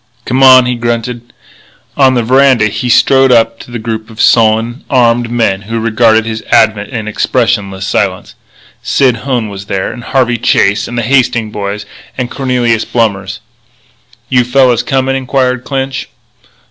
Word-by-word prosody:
"Come 130 +2 -1
on," 130 -1 +7
he 125 - -1
grunted. 120 0 -4 0.6
On 135 -2 +3
the 120 - 0
veranda 130 -1 +3
he 110 +4 -4
strode 135 +2 +4
up 115 -1 +2
to - - -12
the 120 - -5
group 110 0 -5
of 110 0 -14
sullen, 115 +2 +2
armed 120 -2 +2
men 115 -5 0
who 115 +3 -4
regarded 110 0 +2
his 110 -1 -4
advent 110 -2 +2
in 110 -4 -5
expressionless 105 -4 -1
silence. - - -2 0.5
Sid 130 -4 +1
Hone 120 -2 -2
was 100 -1 -8
there, 95 -1 -2
and 120 - -10
Harvey 125 -3 0
Chase, 100 -2 +1
and 120 - -6
the 120 - -1
Hastings 115 -3 0
boys, 100 0 -5 0.3
and 125 -2 -3
Cornelius 125 -4 0
Blommers. 100 -5 -2 0.9
"You 125 0 +2
fellas 125 -1 +2
comin'?" 135 +1 -1
inquired 130 -1 -1
Clinch. 135 -2 -4
120 Hz, 155 wpm, -11 LUFS, 110-130 Hz, 0.9 s, on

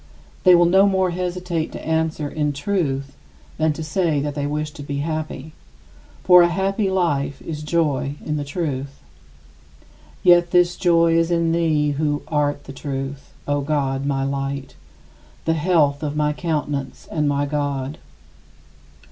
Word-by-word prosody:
They 180 -1 +8
will 175 0 +5
no 190 +3 +5
more 190 -2 +2
hesitate 180 -2 -3
to - - -8
answer, 160 -2 0
"In 150 0 -1
truth," 140 -4 -2 0.4
than 160 0 +3
to 160 - -6
say 155 -1 0
that 145 +1 -2
they 145 0 -2
wish 150 +1 -2
to 150 - -10
be 140 0 -3
happy. 155 -1 -4 0.7
For 180 -1 +8
a 175 - +6
happy 195 +3 0
life 145 -7 0
is 150 -2 -5
joy 150 -3 0
in 150 - -1
the 145 - -2
truth. 140 -3 -4 1.2
Yet 175 -1 +6
this 175 0 +4
is - - -11
joy 170 -2 +4
in 165 0 +1
thee, 155 -3 +2
who 145 0 -1
art 145 -2 0
the 135 - -10
Truth, 135 0 -5 0.2
O 145 0 +1
God 140 -2 -1
my 135 -1 0
Light, 135 0 -3 0.7
"the 160 - +2
health 155 -3 +2
of 150 -1 -3
my 150 0 +1
countenance 145 -4 -3
and 150 -2 +1
my 145 0 +1
God." 145 -1 -3
150 Hz, 155 wpm, -21 LUFS, 140-170 Hz, 1.2 s, They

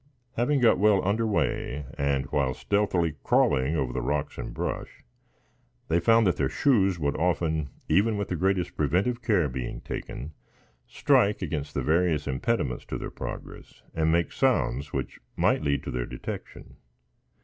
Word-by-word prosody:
Having 130 +4 +1
got 115 -6 +5
well 100 -2 +3
under 110 +3 +1
way, 75 - -1
and 70 -1 0
while 65 -3 +1
stealthily 95 -6 0
crawling 65 +5 +2
over 65 -5 -1
the - - -2
rocks 75 0 -2
and - - -5
brush, - - -5 0.9
they 85 +1 +3
found 115 +4 +4
their 75 -7 +1
shoes 100 - +2
would 70 -3 -1
often, 80 -3 0 0.2
even 105 +6 +3
with 100 - -3
the 90 - -1
greatest 95 0 0
preventive 95 - +1
care 100 -10 +2
being 65 -2 -5
taken, 75 +6 -6 0.5
strike 100 0 +2
against 75 -3 -4
the 70 - 0
various 80 0 +2
impediments 65 - -1
to - - -4
their - - -6
progress - - -8
and 80 0 +1
make 85 -1 +1
sounds 70 +4 +1
which 65 -2 -4 0.2
might - - +2
lead 70 -2 0
to - - -5
their - - -3
detection. - - -8
80 Hz, 155 wpm, -27 LUFS, 70-100 Hz, 0.9 s, got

